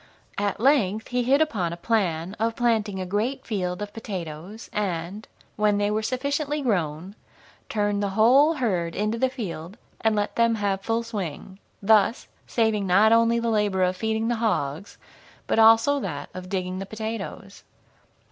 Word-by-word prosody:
At 205 -1 -1
length 220 -5 +2
he 250 0 0
hit 270 +5 +3
upon 195 - -2
a 170 - -6
plan 180 -3 -1
of 225 +1 0
planting 220 -5 0
a 185 - -3
great 210 +8 -2
field 185 -3 -2
of 205 0 -8
potatoes, 185 -1 -7
and, 195 0 -3 0.3
when 210 -1 +2
they 205 0 +1
were 215 +1 0
sufficiently 285 +5 -2
grown, 180 - -1 0.6
turned 205 -1 0
the 200 - 0
whole 275 +9 +5
herd 185 - -1
into 215 +2 -1
the 260 - +2
field 195 - -6 0.3
and 220 -1 +3
let 205 0 -2
them 230 -1 +3
have 200 -2 -1
full 225 +3 -1
swing, 190 -4 -6 0.2
thus 215 +2 +3 0.2
saving 220 -4 +1
not 205 +5 +5
only 230 0 +4
the 235 0 0
labor 205 -3 +1
of 180 0 +1
feeding 220 +2 -1
the 240 0 0
hogs, 180 -5 -2 0.5
but - - +1
also 225 +6 +6
that 145 - -5
of 185 0 -8
digging 185 -1 -3
the 195 - -6
potatoes. 220 +2 -6
210 Hz, 165 wpm, -25 LUFS, 190-230 Hz, 0.6 s, also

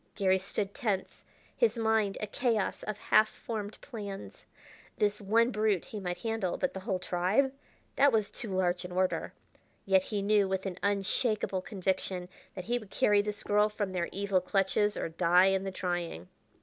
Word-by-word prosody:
Garry 190 -1 +3
stood 195 +1 -3
tense, 210 -8 -2 0.3
his 470 - +2
mind 220 -3 +1
a - - -2
chaos 220 -1 0
of 215 -1 -4
half 215 +1 +4
formed 215 -2 -6
plans. 205 -7 -8 0.5
This 210 0 +1
one 230 +4 +3
brute 210 -4 +1
he 215 - -6
might 180 -2 -4
handle, 225 -5 -1
but - - -1
the 190 - -5
whole 190 0 -1
tribe 185 +10 +1 0.4
that 280 +1 +6
was 215 -3 +1
too 225 - -7
large 180 -1 +1
an 180 - -7
order. 185 +1 0 0.5
Yet 190 -1 +4
he 200 +1 -3
knew 205 -1 +3
with 190 0 -2
an 185 -1 -4
unshakable 200 0 0
conviction 185 -2 -2 0.3
that 185 -2 -6
he 240 +2 0
would 215 -4 -13
carry 205 +1 +3
this 210 0 -5
girl 210 +1 +3
from 205 -2 -3
their 175 -2 -2
evil 200 -1 +1
clutches 195 +2 +1
or - - -2
die 180 +3 +4
in 190 0 0
the 195 - -2
trying. 175 - -3
200 Hz, 175 wpm, -30 LUFS, 185-215 Hz, 0.5 s, that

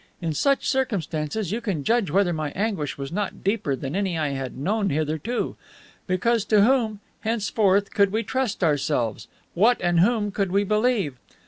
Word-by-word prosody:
In 165 -3 -2
such 275 - +1
circumstances 195 - -1
you 230 +3 -2
can 185 -11 -2
judge 230 - +2
whether 180 +2 +2
my 155 -2 -2
anguish 195 -8 -2
was 140 +1 -5
not 200 +2 -3
deeper 195 -8 0
than 135 +4 -5
any 190 -4 0
I 155 -2 0
had 135 -2 -4
known 200 +8 0
hitherto. 155 - -2 0.5
Because 215 +5 +1
to 210 -1 +4
whom, 225 -4 +2 0.2
henceforth, 205 -3 +1
could 200 -2 +3
we 220 +2 0
trust 250 -3 -2
ourselves? 130 - 0 0.3
what 225 +7 +4
and 175 -1 +2
whom 210 +2 +2
could 195 -2 -1
we 200 +2 +3
believe? 210 - +1
195 Hz, 165 wpm, -24 LUFS, 155-220 Hz, 0.5 s, to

